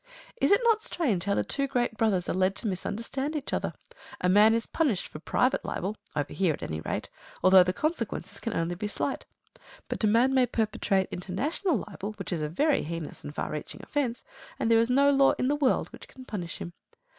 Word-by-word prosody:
Is - - +2
it 405 - +6
not 455 -2 +4
strange 265 - -1
how 200 0 +1
the - - +1
two 275 -1 -1
great 245 -3 0
brothers 205 -6 +1
are - - 0
led 185 +1 +2
to 225 - -3
misunderstand 230 - -3
each 290 -2 -4
other? - - -1 0.5
A 180 - +1
man 210 +4 +6
is 230 - 0
punished 275 - 0
for 150 - -9
private 250 - +1
libel 195 +4 -3 0.2
(over 145 -2 -2
here 185 -5 +2
at - - -11
any 80 0 -4
rate), - - -4 0.3
although 185 0 +8
the 180 0 +2
consequences 310 - -3
can 230 - -3
only 165 +1 0
be 195 +4 -3
slight. 210 - -3 0.6
But - - -3
a - - +5
man 235 +5 +4
may 255 -2 +4
perpetrate 210 -4 0
international 250 - -1
libel, 205 +2 -6
which 205 - -5
is 165 - -2
a 150 - -2
very 290 - +2
heinous 165 0 -6
and 145 - -8
far - - -3
reaching 150 - -6
offence, 260 -5 -2 0.3
and 230 - 0
there 225 - +6
is 230 +1 +2
no 280 +3 +5
law 275 -1 +5
in 255 - -1
the 290 - +2
world 285 -3 +1
which - - -12
can 260 -1 -13
punish 180 -9 -5
him. 170 - -7
220 Hz, 215 wpm, -28 LUFS, 185-270 Hz, 0.6 s, although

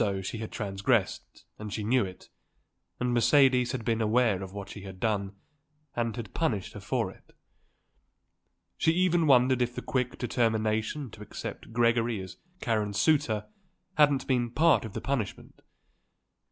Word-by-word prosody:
She 110 +4 -4
had 110 - -6
transgressed, 100 +1 -1
and 105 -1 -6
she 105 - -3
knew 125 +3 +3
it, 95 -1 -9 0.7
and 125 -1 0
Mercedes 125 0 +4
had 125 -4 -4
been 115 0 +1
aware 110 -3 +2
of 95 -1 -7
what 100 0 -7
she 100 - -8
had 95 -1 -9
done 100 -2 -1 0.6
and 115 -2 -1
had 120 -3 -7
punished 110 - -1
her - - -7
for - - -1
it. - - -21 1.5
She 160 - +3
even 175 -2 +2
wondered 130 -1 +5
if 120 0 0
the - - -5
quick 125 -2 -1
determination 110 +2 0
to 105 - -12
accept 105 - -7
Gregory 115 -1 +2
as 95 -1 -8 0.2
Karen's 105 -3 0
suitor 140 -9 +2 0.5
hadn't 145 -5 +3
been 125 -3 +1
part 155 +1 +3
of 110 - -8
the - - -4
punishment. 130 -8 -4
115 Hz, 155 wpm, -28 LUFS, 105-130 Hz, 1.5 s, wondered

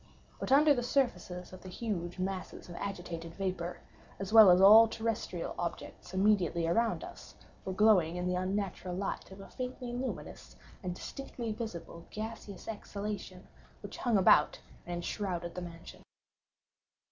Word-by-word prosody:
But - - -4
the 270 - +7
under 290 -3 +5
surfaces 185 -9 -1
of 185 - -10
the 185 - -9
huge 180 -4 -4
masses 185 0 -4
of 175 - -9
agitated 170 -4 -5
vapor, 180 -3 -3 0.4
as 195 +1 -5
well 220 -3 +10
as 180 0 +7
all 215 +4 +9
terrestrial 220 -6 -3
objects 175 0 -5
immediately 190 -3 +2
around 225 +7 +1
us, - - -11 0.3
were 190 - -2
glowing 185 -5 +4
in 180 0 -2
the 180 - 0
unnatural 185 -1 -2
light 195 +2 -3
of 190 +1 -12
a 195 - -10
faintly 250 -1 -5
luminous 255 +2 -5 0.3
and 180 -2 -4
distinctly 240 0 -6
visible 210 -7 -7
gaseous 215 -2 -7
exhalation 205 -3 -6 0.4
which - - -8
hung 235 -4 +2
about 165 -5 +5 0.3
and 175 - -3
enshrouded 175 -1 -3
the 180 - -5
mansion. 170 -1 -10
190 Hz, 145 wpm, -32 LUFS, 175-220 Hz, 0.4 s, well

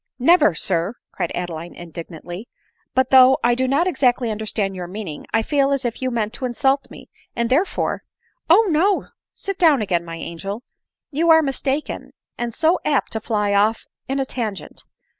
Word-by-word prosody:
" - - -51
Never, 215 - +4
sir," 175 +6 0 0.2
cried 175 -3 -3
Adeline 175 -1 -5
indignantly.; 175 +4 -8 0.2
" - - -45
but, 260 -1 +2
though 260 0 +8
1 240 +1 +4
do 260 +2 0
npt 280 +6 +2
exactly 250 -8 +1
understand 210 -2 -2
your 180 -1 -5
meaning, 180 -5 -7
I 225 0 +2
feel 280 +1 +2
as 275 -2 0
if 235 +1 -3
you 260 - 0
meant 225 -3 -2
to 255 - -3
insult 270 +3 +1
me, - - -12 0.3
and 235 0 -1
therefore 330 +9 +1 0.2
— - - -69
" - - -41
" - - -44
Oh 405 +7 +7
no 370 +6 +2
— - - -71
sit 395 -1 -5
down 315 -6 +5
again, 185 -5 0
my 165 -1 -7
angel; 195 +7 -6 0.5
you 325 +4 +1
are 320 0 +7
mis 270 -3 -2
taken, 280 +3 -3 0.2
and 240 0 -3
so 320 +9 +2
apt 285 -3 +1
to 220 - -2
fly 210 -2 0
off 210 +3 +2 0.2
in 270 +2 -1
a 270 - 0
tangent 220 -7 -5
240 Hz, 200 wpm, -21 LUFS, 200-275 Hz, 0.5 s, though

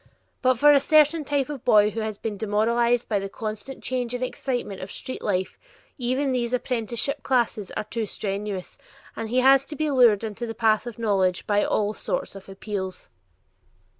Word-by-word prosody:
But 255 -1 +3
for 295 +4 +6
a 280 - +6
certain 305 +2 +4
type 285 -2 0
of 285 -4 -7
boy 210 -4 +5
who 225 - -4
has 215 -2 -3
been 215 -1 -4
demoralized 235 +4 +1
by 210 -3 +1
the 195 0 -5
constant 215 +6 -6
change 250 -1 -2
and 245 - -3
excitement 245 -6 -3
of 185 - -7
street 260 - -6
life, 190 -2 -2 0.4
even 260 +3 0
these 245 -1 -1
apprenticeship 240 +1 -1
classes 235 -6 0
are - - -1
too 220 +1 -4
strenuous, 200 -2 -4 0.4
and 225 -1 -5
he 255 +2 +2
has 270 +1 +6
to 300 - -7
be 305 +1 -1
lured 235 -6 +5
into 225 +2 -4
the 225 - -5
path 220 0 +2
of 240 - -7
knowledge 195 -5 +1
by 205 0 +2
all 210 0 0
sorts - - -3
of 195 0 -12
appeals. 195 -1 -6
230 Hz, 185 wpm, -25 LUFS, 210-255 Hz, 0.4 s, for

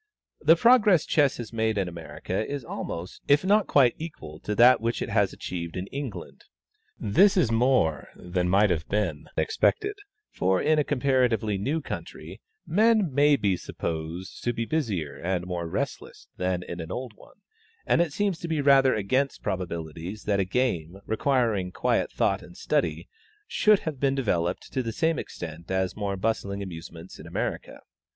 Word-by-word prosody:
The 160 +2 +6
progress 210 - +5
Chess 145 -3 +2
has 120 -1 -7
made 110 -1 0
in 95 -2 0
America 90 +3 -4
is 140 -4 -4
almost, 85 -5 -6
if 145 +5 +4
not 205 +2 +3
quite, 130 -4 +5
equal 150 - -8
to 105 - -3
that 120 +3 +6
which 115 +1 -1
it - - -3
has - - +2
achieved 85 -1 -6
in 90 - -3
England. 135 -5 -7 0.5
This 195 - +4
is 160 -11 +3
more 115 - +2
than 90 0 -2
might 100 +1 +4
have 80 -3 -2
been 95 -8 -1
expected; 435 -1 +1 0.4
for 95 0 +1
in 155 0 +3
a - - +3
comparatively 125 -7 +1
new 145 +10 -1
country - - -8 0.2
men 210 - +3
may 145 +1 +5
be 100 -8 +1
supposed 85 +2 -5
to 120 - +1
be 115 0 -2
busier 105 - -2
and 90 0 -2
more 90 -2 -3
restless - - -5
than 90 -1 -1
in 85 - -7
an 80 +1 -6
old 125 +2 -4
one, - - -19 0.5
and - - +3
it 170 -3 0
seems 195 +1 -1
to 170 - -5
be 160 -2 -1
rather 135 -2 +5
against 130 +7 0
probabilities 85 0 -4
that 100 -1 +1
a 95 - +2
game, 95 -6 -1
requiring 110 -6 +1
quiet - - 0
thought - - +1
and 90 0 -14
study, 150 -1 -1 0.4
should 215 - +3
have 155 -5 -5
been 135 0 +1
developed 90 -9 -1
to 130 - 0
the 115 -2 -4
same 160 0 +1
extent 85 0 -8
as 95 -1 -1
more 100 -2 -2
bustling 100 -1 -2
amusements 85 -1 -9
in - - -10
America. - - -4
110 Hz, 170 wpm, -26 LUFS, 90-145 Hz, 0.5 s, The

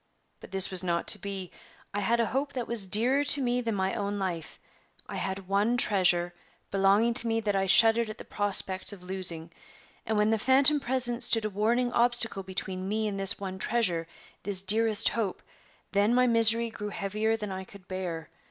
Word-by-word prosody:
But - - -13
this 190 0 +3
was 185 -1 +2
not 170 -1 -2
to 210 - +3
be. 195 -2 -7 0.4
I 205 - -2
had 230 +4 0
a 230 - +2
hope 280 +4 -3
that 250 -3 -5
was 225 -5 0
dearer 245 +9 +3
to 285 - +6
me 250 -1 -1
than 230 -3 -3
my 190 0 -2
own 205 0 -3
life; 175 -5 -5 0.5
I - - -7
had 190 0 -5
one 205 +5 0
treasure 175 -5 +1 0.4
belonging 200 +4 +2
to 235 -1 +3
me 225 0 0
that 205 -2 -2
I 195 0 0
shuddered 225 +3 +4
at 215 - -8
the - - -11
prospect 195 -1 -2
of 185 -3 -13
losing; 175 -3 -5 0.6
and 220 0 -1
when 210 +1 +2
the 225 - 0
phantom 275 +5 +5
presence 250 -2 0
stood 225 -2 +1
a 215 - -3
warning 235 +5 0
obstacle 240 -4 0
between 190 0 -5
me 215 +1 -1
and 200 -1 -5
this 195 -1 +3
one 190 -1 -7
treasure, 185 -8 0 0.3
this 195 -2 -2
dearest 215 +2 +5
hope, 215 -5 -4 0.5
then 205 +4 +1
my 250 0 +3
misery 230 -1 +3
grew 210 -1 -7
heavier 215 +3 -2
than 210 -2 -6
I 190 0 -6
could 185 -1 -16
bear. 175 -4 -6
205 Hz, 200 wpm, -27 LUFS, 190-230 Hz, 0.6 s, to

